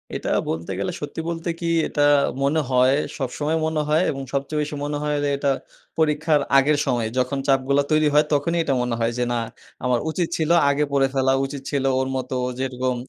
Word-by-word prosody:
এটা - - -3 0.2
বলতে 85 +4 -3
গেলে 100 - -1
সত্যি 145 +2 -5
বলতে 170 +1 -4
কি, 170 - -3 0.2
এটা 145 - -2 0.4
মনে 150 +3 +2
হয়, 130 +2 +4 0.2
সবসময় 145 +4 -2
মনে 160 -1 0
হয় 155 +4 +3
এবং 135 -1 -5
সবচেয়ে 140 +2 -1
বেশি 150 0 -4
মনে 145 0 -2
হয় 150 0 0
যে 145 - +1
এটা 140 -1 +1 0.5
পরীক্ষার 150 -1 +2 0.2
আগের 145 +2 +4
সময়। 120 -4 0
যখন 130 +2 0
চাপগুলো 135 +1 +3
তৈরি 155 0 +4
হয়, 150 +1 +5
তখনই 170 +4 +1
এটা 140 - 0
মনে 125 -1 -1
হয় 115 +1 +1
যে, 125 - +1
না, 120 - 0 0.5
আমার 125 -2 +2
উচিত 170 +1 -1
ছিলো 160 +1 +2 0.2
আগে 145 +1 +1
পড়ে 135 -1 +3
ফেলা, 135 0 +2
উচিত 140 0 -6
ছিল 140 -2 0 0.2
ওর 130 - 0
মতো 130 0 -3 0.2
যেরকম 130 -1 -1
140 Hz, 195 wpm, -22 LUFS, 130-150 Hz, 0.5 s, হয়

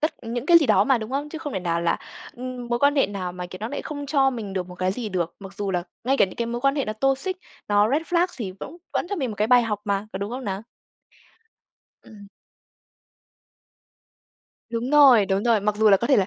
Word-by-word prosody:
tất 310 - 0
những 240 +3 -4
cái 340 -1 +8
gì 300 - +1
đó - - +4
mà, 265 -3 +3
đúng 220 +2 -6
không? 285 +2 -2
Chứ 320 - -7
không 295 -4 -6
thể 190 - -2
nào 170 -1 -1
là, 170 0 +1 0.4
ừm, 250 0 -6
mối 240 0 0
quan 285 +2 +3
hệ 275 - +4
nào 185 -3 -5
mà, 180 0 -6
kiểu, 185 +1 -10
nó 220 - -3
lại 285 - -5
không 285 -2 -6
cho 270 -2 +3
mình 220 -6 -6
được 185 -2 -3
một 180 - -9
cái 185 +1 -1
gì 230 0 -4
được. 175 -4 -2
Mặc 195 0 -10
dù 200 -1 -3
là 180 -2 0 0.2
ngay 270 +2 +2
cả - - +5
những 185 - -8
cái 235 - -1
mối 240 +1 -3
quan 275 +1 +2
hệ 275 - 0
nó 215 - -3
toxic, 270 - 0 0.3
nó 205 +2 +3
red 300 +4 +1
flag 350 +1 +2
thì 195 -5 -4
cũng 340 - -8 0.2
vẫn - - -1
cho 405 - -2
mình 265 -6 -2
một 210 - -7
cái 210 +1 +1
bài 245 0 +6
học 210 -3 -2
mà, 200 0 -1
có 190 - -4
đúng 200 +2 -4
không 255 +2 -5
nào? 195 0 -3 1.4
Ừm. 205 -2 -14 2.4
Đúng 235 +3 -2
rồi, 265 -9 +7
đúng 195 +1 0
rồi. 230 -3 +3
Mặc 210 +1 0
dù 220 0 +4
là 195 - +7
có 235 - -2
thể 270 - +4
là 190 -2 +2
230 Hz, 260 wpm, -24 LUFS, 200-270 Hz, 2.4 s, cái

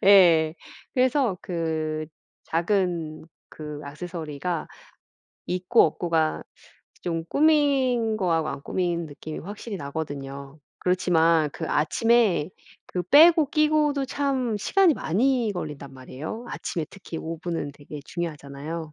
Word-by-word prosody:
예. 170 -5 +6 0.4
그래서 255 -6 +2
그 160 -3 -2 0.4
작은 170 -3 -1 0.2
그 150 -1 -8
액세서리가 160 +1 -4 0.8
있고 185 +6 +3
없고가 165 -2 0 0.6
좀 165 -2 -2
꾸민 270 -7 +3
거하고 165 -5 +1
안 140 - -5
꾸민 170 0 -1
느낌이 155 +1 -8
확실히 205 +2 -7
나거든요. 140 -1 -6 0.2
그렇지만 165 -3 +3
그 - - -5
아침에 205 +1 +2 0.4
그 180 - -3
빼고 310 - +6
끼고도 300 -2 +2
참 265 -4 -1
시간이 370 - +4
많이 240 - +1
걸린단 145 -5 -6
말이에요. 140 - -7
아침에 165 -3 -3
특히 185 -4 -9
5 165 0 -5
분은 165 -4 -3
되게 145 +1 -10
중요하잖아요. 155 -1 -5
170 Hz, 250 characters per minute, -25 LUFS, 155-230 Hz, 0.8 s, 예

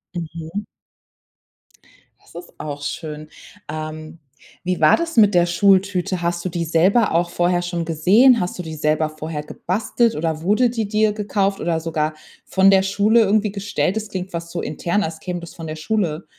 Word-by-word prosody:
Mhm. 165 +4 -6 1.6
Das - - -22
ist 175 0 -10
auch 145 -1 -6
schön. 155 +1 -6 0.4
Ähm, 155 +1 -7 0.4
wie 180 0 -1
war 155 -1 +6
das 330 -6 -4
mit 210 -3 +6
der 175 0 +5
Schultüte? 190 0 +2
Hast 170 0 -1
du - - 0
die 170 0 -2
selber 185 +8 +3
auch 170 +1 +1
vorher 175 0 +1
schon 175 -1 -3
gesehen? 205 - +5
Hast 180 +1 -3
du - - -3
die 160 -1 -7
selber 155 +1 0
vorher 155 -1 -6
gebastelt 215 +8 -1
oder 160 0 -2
wurde 215 +7 +3
die 225 -3 -2
dir 215 0 +2
gekauft 200 -1 -1
oder 165 -1 -1
sogar 160 -1 -2 0.3
von 190 0 +4
der 190 0 +5
Schule 210 +4 +3
irgendwie 210 0 +2
gestellt? 195 -3 -1
Das 220 -1 -4
klingt 190 -1 -5
fast 170 0 -6
so 170 - -3
intern, 175 +6 -1
als 160 0 -5
käme 180 -1 -4
das 170 - -10
von 165 -2 -7
der 155 - -5
Schule. 170 -1 -2
175 Hz, 180 wpm, -21 LUFS, 160-200 Hz, 1.6 s, war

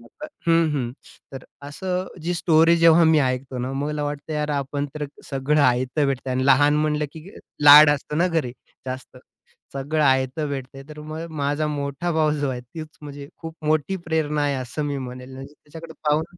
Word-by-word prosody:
खरं - - -17 0.2
तर - - -3 0.2
हं, 165 -1 +4
हं. 120 -4 -2 0.4
तर 135 -1 -8 0.2
असं 185 +4 -3 0.2
जी 175 +2 -1
स्टोरी 165 0 +4
जेव्हा 165 0 +6
मी 160 -1 +5
ऐकतो 130 -1 -2
ना, 130 +2 -3
मला 145 +2 -2
वाटतं 145 +2 -5
यार, 150 0 -2
आपण 145 0 -2
तर 150 -1 -3 0.3
सगळं 140 +2 +1
आयत 125 +3 +1
भेटतंय 130 -1 -2
आणि 130 +1 0
लहान 145 +2 +5
म्हणलं 150 0 0
की 160 +3 -11 0.4
लाड 145 +1 +10
असतं 150 +1 -2
ना 175 - +3
घरी 155 -8 -1 0.3
जास्त. 130 0 -7 0.6
सगळं 145 +3 -1
आयत 130 +2 +2
भेटतंय, 135 -2 -5
तर 150 0 -10
मग 155 +2 -6
माझा 145 +2 0
मोठा 145 +3 -3
भाऊ 155 -1 +2
जो 145 -1 -1
आहे, 125 -1 -4
तीच 155 +6 -9
म्हणजे 145 -1 -9
खूप 165 -1 -7
मोठी 155 +5 +1
प्रेरणा 150 -2 0
आहे 145 -1 0
असं 130 +3 -4
मी 145 -1 -2
म्हणेल. 125 0 -8
म्हणजे 135 +2 -10
त्याच्याकडे 160 +2 -12 0.2
पाहून 155 +2 +2
145 Hz, 185 wpm, -23 LUFS, 135-155 Hz, 0.6 s, लाड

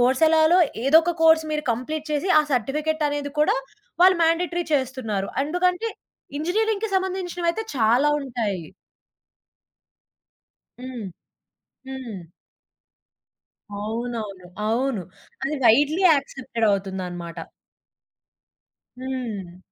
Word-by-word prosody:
కోర్సెలాలో 315 +7 +4 0.3
ఏదో 305 +4 +7
ఒక 345 +1 0
కోర్స్ 320 0 +6
మీరు 300 0 -2
కంప్లీట్ 310 +6 -4
చేసి, 300 +6 -1
ఆ - - +1
సర్టిఫికెట్ 300 +6 0
అనేది 290 -1 -3
కూడా 300 - +3 0.5
వాళ్ళు 370 0 +7
మ్యాండేటరి 345 +1 +1
చేస్తున్నారు. 250 -7 -2 0.2
ఎందుకంటే 360 +6 0 0.5
ఇంజినీరింగికి 425 +6 0
సంబంధించినవైతే 370 0 -2
చాలా 240 +5 +3
ఉంటాయి. 225 - -3 2.1
హ్మ్. 250 -5 -7 0.8
హ్మ్. 260 -6 -6 1.6
అవునవును. 215 -3 -5 0.2
అవును. 235 -1 0 0.4
అది 280 +3 -1
వైడ్లీ 290 - +4
యాక్సెప్టెడవుతుందనమాట. 195 - -2 1.6
హ్మ్. 235 -9 -5
270 Hz, 80 wpm, -23 LUFS, 225-320 Hz, 2.1 s, ఏదో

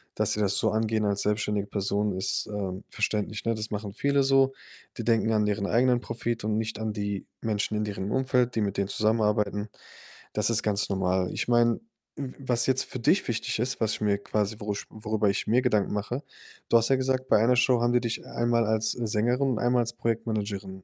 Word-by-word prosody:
dass - - +1
sie 105 - -1
das 100 -1 +2
so - - +2
angehen 110 0 0
als 100 -1 0
selbstständige 105 -1 0
Person 100 0 -1
ist, 95 0 -1
ähm, 100 -2 -4
verständlich, 105 0 -2
ne? 115 - +1
Das 110 0 -4
machen 105 -1 -4
viele 140 +4 +2
so. 135 0 +4 0.4
Die - - -3
denken 115 -1 +2
an 105 -1 +2
deren 100 -1 0
eigenen 125 +1 +3
Profit 115 -2 -3
und 110 0 0
nicht 110 -1 -3
an 110 -1 -2
die 100 -2 -3 0.2
Menschen 105 -1 -1
in 105 - 0
deren 100 -1 -4
Umfeld, 125 -2 +1
die 110 - +1
mit 100 -1 -1
denen 100 -1 +1
zusammenarbeiten. 105 -1 +1 0.7
Das 105 +1 +1
ist 115 -1 +1
ganz 105 -1 +1
normal. 95 -1 0
Ich - - -2
meine, 120 - +3 0.4
w 135 -2 -5
was 120 -3 0
jetzt 130 0 +2
für 130 - -7
dich 170 - +2
wichtig 115 -1 -2
ist, 125 0 -2
was 110 0 +1
ich - - -10
mir 100 -1 +2
quasi 105 +1 -1
worü 105 0 -2
worüber 110 -1 -1
ich 100 - -1
mir 120 +4 +4
Gedanken 110 -6 +1
mache: 120 +7 -3 0.5
du 115 - +6
hast 115 - +2
ja 135 - +5
gesagt, 130 0 0
bei - - +5
einer 125 +1 +4
Show 125 -1 +4
haben 120 - +2
die 125 - +5
dich 115 -1 -3
einmal 115 -1 +1
als 110 0 +1
Sängerin 120 +4 0
und 120 - -1
einmal 120 0 +3
als 115 - -2
Projektmanagerin, 105 -5 -3
110 Hz, 215 wpm, -27 LUFS, 105-120 Hz, 0.7 s, du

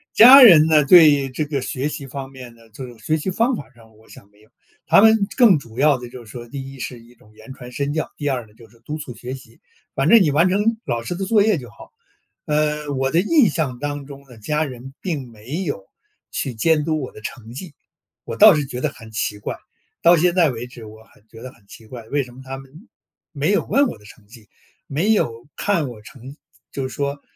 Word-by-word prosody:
家 260 +5 +10
人 170 -10 +9
呢， 155 -2 +4
对 145 -4 +6
这 150 +4 -3
个 140 -2 -3
学 130 +3 -3
习 140 -3 -7
方 135 0 -8
面 125 -3 -12
的， 115 -1 -21
就 130 +4 -9
是 120 -2 -14
学 155 - +1
习 170 +5 -4
方 230 +7 0
法 145 - -9
上， 110 -2 -20
我 110 - -23
想 100 - -15
没 105 - -27
有。 110 - -24 0.4
他 - - +6
们 220 -2 +4
更 220 - +5
主 115 -3 -15
要 145 0 +3
的 120 -1 -9
就 120 -2 -12
是 105 - -14
说， 120 -1 -9
第 135 +1 -8
一 135 - -13
是 120 +2 -6
一 115 +1 -19
种 110 -3 -24
言 130 - -12
传 125 -1 -12
身 140 +2 -3
教， 155 0 -3
第 145 -1 -2
二 125 -4 -3
呢 105 - -23
就 115 0 -17
是 115 +1 -24
督 150 +6 -6
促 130 -5 -8
学 125 +4 -7
习。 130 - -16 0.3
反 - - 0
正 230 -1 +7
你 155 -6 +2
完 165 +6 +3
成 210 +4 +1
老 120 -3 -3
师 175 - -4
的 195 +2 -4
作 210 0 +3
业 210 -4 +2
就 120 -3 -11
好。 - - -16 0.5
呃， 150 -1 -1
我 135 0 -1
的 165 - +2
印 265 - +3
象 135 -7 -3
当 145 +1 -5
中 140 -1 -11
呢， 125 -3 -15
家 150 +8 -1
人 130 -1 -9
并 145 -9 -4
没 115 - -7
有 120 - -5 0.5
去 130 - -3
监 155 +6 +2
督 155 -1 -1
我 130 - -6
的 - - -13
成 115 -1 -9
绩， 155 +2 -9 0.5
我 - - -6
倒 - - +8
是 150 -1 -1
觉 125 -2 -7
得 155 - 0
很 115 -5 -14
奇 105 -1 -3
怪。 105 - -6 0.5
到 170 +1 +6
现 175 +2 +2
在 175 -4 +3
为 120 -2 -6
止， 120 -2 -12
我 110 +1 -14
很 110 -1 -27
觉 115 +1 -15
得 130 - -8
很 100 - -26
奇 110 - -14
怪， 115 0 -10
为 145 +1 -1
什 125 - -14
么 130 - -13
他 135 0 -7
们 135 0 -14 0.6
没 150 +6 -1
有 205 - +1
问 280 +1 +2
我 - - -7
的 105 - -20
成 105 0 -17
绩， 110 -1 -17 0.4
没 170 +10 0
有 120 - -1
看 170 -9 -1
我 110 -3 -11
成 135 +4 -13 0.3
就 135 -1 -4
说， 140 +2 -4
135 Hz, 265 characters per minute, -20 LUFS, 120-155 Hz, 0.6 s, 家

